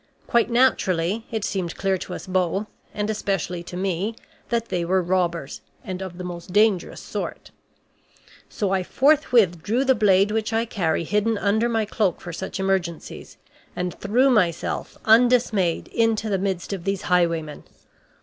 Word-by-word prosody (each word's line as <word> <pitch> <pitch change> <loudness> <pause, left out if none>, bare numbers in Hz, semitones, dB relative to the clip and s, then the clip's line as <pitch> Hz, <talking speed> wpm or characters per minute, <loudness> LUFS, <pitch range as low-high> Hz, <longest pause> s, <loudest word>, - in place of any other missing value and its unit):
Quite 235 0 +2
naturally, 215 -5 +1
it 220 -3 -2
seemed 180 -4 -3
clear 195 -1 +1
to - - -6
us - - -8
both, 185 +2 0 0.3
and 210 0 -2
especially 195 -5 -2
to 180 - -7
me, 195 +3 -1 0.3
that 235 -1 -1
they 180 -2 -1
were 185 +2 +2
robbers, 175 -4 -1 0.2
and 185 -1 -5
of 185 -2 -7
the 180 - -6
most 175 0 -7
dangerous 205 -2 +2
sort. - - -6 1.0
So 200 -3 -2
I 190 -1 +2
forthwith 240 - +3
drew 235 +9 0
the 265 - +5
blade 205 -3 +3
which 220 0 -1
I 225 +1 +1
carry 170 -8 -1
hidden 210 +5 0
under 215 +4 +1
my 225 -2 +1
cloak 205 -4 0
for 175 - -8
such 190 +3 -5
emergencies, 190 -4 -3 0.4
and 180 -1 -2
threw 250 +7 +3
myself, 180 -8 0
undismayed, 225 -6 +3
into 225 -1 +1
the 195 - +1
midst 190 -1 -2
of 190 -3 -5
these 195 0 -2
highwaymen. 170 -4 0
195 Hz, 160 wpm, -23 LUFS, 180-220 Hz, 1.0 s, the